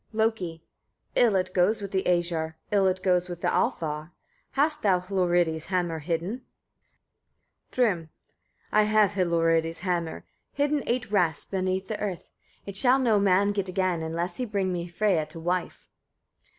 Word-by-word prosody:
Loki. 215 -7 -1 0.5
8. - - +4
"Ill 220 -4 +2
it 185 0 0
goes 195 +5 +3
with 200 -1 -6
the 190 - +1
Æsir, 170 -2 0 0.2
Ill 200 -2 +4
it 185 0 -1
goes 180 -1 +2
with 175 -1 -7
the - - +1
Alfar. 155 0 -1 0.4
Hast 300 +2 +1
thou 190 -3 +3
Hlorridi's 175 -4 0
hammer 175 -3 -1
hidden?" 175 - -3 1.3
Thrym. 195 -10 0 0.6
9. 215 - +5
"I - - +4
have 215 -2 +4
Hlorridi's 165 -3 +1
hammer 175 -3 -2 0.3
hidden 290 +1 +1
eight 235 -3 -1
rasts 175 -7 +1
beneath 190 0 -2
the 215 - -4
earth; 195 -4 -4 0.3
it 200 - -7
shall 250 +5 +5
no 230 -6 +3
man 200 +1 +3
get 200 -2 -2
again, 185 -2 0
unless 170 +2 -3
he 255 - -2
bring 200 -4 -1
me 175 0 -3
Freyia 175 -3 +1
to 165 - -9
wife." 175 +2 -3
185 Hz, 160 wpm, -27 LUFS, 170-205 Hz, 1.3 s, 9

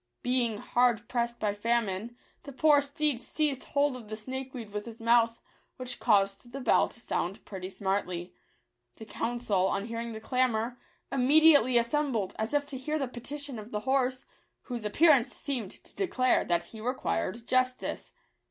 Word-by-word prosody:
Being 245 -3 +1
hard 240 0 +1
pressed 235 -1 -1
by 210 -1 0
famine, 230 0 -1 0.2
the 285 - -9
poor 290 +2 +4
steed 285 -2 0
seized 280 +2 -1
hold 285 -2 +1
of 230 -4 -10
the 215 - -4
snakeweed 255 -1 -6
with 210 +2 -5
his 230 -1 -9
mouth, 230 0 +3 0.4
which 255 -1 -6
caused 200 +1 +2
the 275 - -4
bell 250 - +3
to - - -15
sound 195 -4 -3
pretty 185 -2 -6
smartly. 190 -3 -2 0.6
The 220 - -10
council, 220 -4 0
on 200 +1 -1
hearing 230 0 -4
the 220 - -6
clamour, 245 0 0 0.3
immediately 275 -1 +6
as 235 0 +1
sembled, 245 -10 0
as 220 +6 -1
if 290 0 +2
to 265 - -6
hear 300 +4 -2
the 275 -3 -1
petition 265 +1 -6
of 215 +1 -9
the 210 -2 -3
horse, 260 +1 0 0.4
whose 240 -4 -5
appearance 275 +2 +4
seemed 250 -9 -3
to - - -16
declare 255 -10 +2
that 170 0 +2
he 215 +5 -11
re 250 +4 -1
quired 85 - -2
justice. 255 0 0
240 Hz, 170 wpm, -29 LUFS, 215-265 Hz, 0.6 s, immediately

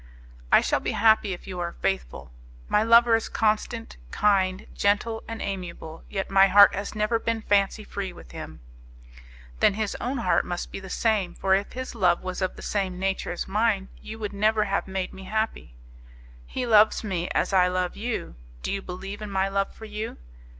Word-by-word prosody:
"I - - +7
shall - - +1
be - - -3
happy 220 -2 +4
if 180 - -6
you 185 -2 -6
are 170 -1 -3
faithful. 70 -8 -3 0.4
My 210 - +3
lover 230 +1 +6
is 225 - -2
constant, 225 +1 -1
kind, 190 - +1
gentle 210 +3 +1
and 225 -1 -5
amiable; 175 -4 -6
yet 195 -1 -3
my 195 0 +6
heart 200 +1 +7
has 200 +2 -4
ever 215 +2 +1
been 225 -1 -2
fancy 205 +1 +2
free 200 -2 -5
with - - -14
him." - - -9 1.0
"Then 195 - +4
his 215 -1 -2
own 260 +3 -2
heart 235 - +2
must 175 0 -5
be - - -5
the 190 0 -10
same; 210 -3 0
for 190 - +1
if 195 +1 0
his 255 0 -5
love 180 -6 +2
was 185 +1 -4
of 185 - -1
the - - -10
same 190 -3 -2
nature 190 0 -2
as 175 - -4
mine 205 -1 +1
you 220 - -8
would 210 -2 -5
never 215 +1 +2
have 200 -1 -1
made 190 -1 -3
me 190 0 -10
happy." 215 - -3 0.7
"He 255 - -3
loves 220 -2 +5
me 180 -4 -2
as - - 0
I 180 -1 +5
love 180 0 -1
you; 230 - -4 0.3
do - - -2
you 195 - -2
believe 195 +3 -7
in 210 - -5
my 195 0 0
love 195 0 -1
for 220 - -11
you?" 215 +1 -5
200 Hz, 195 wpm, -26 LUFS, 185-220 Hz, 1.0 s, I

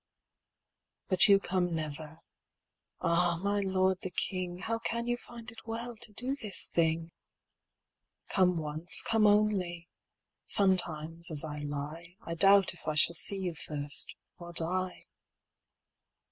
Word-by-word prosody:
But 185 0 +5
you 200 -1 +6
come 180 -2 -1
never. 155 +1 -6 0.8
Ah, 170 0 +2
my 205 0 0
Lord 190 -1 +1
the 190 - -4
King, 180 0 -3
How 225 +4 -3
can 235 +1 -3
you 240 0 0
find 240 0 -11
it 225 0 -15
well 230 +1 -5
to 215 - -8
do 255 +6 -3
this 215 -8 0
thing? 165 0 0 1.2
Come 180 -2 +2
once, 155 +2 +3
come 220 -2 +3
only: 195 -5 +1 0.6
sometimes, 170 -3 +1
as 155 -2 0
I 150 -1 -5
lie, 150 +4 -6
I 170 - -4
doubt 195 +3 +4
if 175 - -15
I 155 - -1
shall 160 +3 +5
see 195 +4 +3
you 185 -3 -3
first, 145 -2 -1 0.2
or 175 0 -10
die. 180 +2 -1
180 Hz, 135 wpm, -30 LUFS, 165-200 Hz, 1.2 s, you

